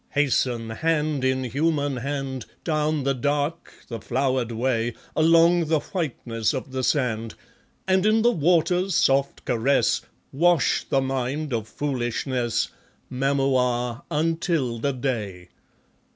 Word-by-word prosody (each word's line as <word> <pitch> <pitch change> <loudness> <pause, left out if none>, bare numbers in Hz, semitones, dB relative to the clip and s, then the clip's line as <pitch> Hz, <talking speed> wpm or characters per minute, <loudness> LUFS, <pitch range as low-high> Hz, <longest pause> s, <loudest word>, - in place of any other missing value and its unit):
Hasten, 125 -5 +1
hand 150 +1 0
in 130 0 +1
human 145 +2 0
hand, 135 0 -4 0.2
Down 155 -2 0
the 135 +1 +1
dark, 145 +5 -2 0.2
the 115 -2 -5
flowered 130 0 0
way, 115 0 -1 0.2
Along 165 +2 +5
the 155 0 +2
whiteness 120 - -2
of 130 0 -5
the 130 0 -3
sand, 115 -5 0 0.5
And 190 0 +3
in 215 +1 +3
the 240 - +5
water's 180 +1 +2
soft 135 +1 +2
caress, 125 +4 +2 0.3
Wash 170 +2 +2
the 135 - +2
mind 135 +2 -2
of 110 -2 -2
foolishness, 125 -2 -2 0.4
Mamua, 130 -2 0
until 160 -6 0
the 140 +4 0
day. 110 -9 -4
135 Hz, 120 wpm, -24 LUFS, 125-155 Hz, 0.5 s, Along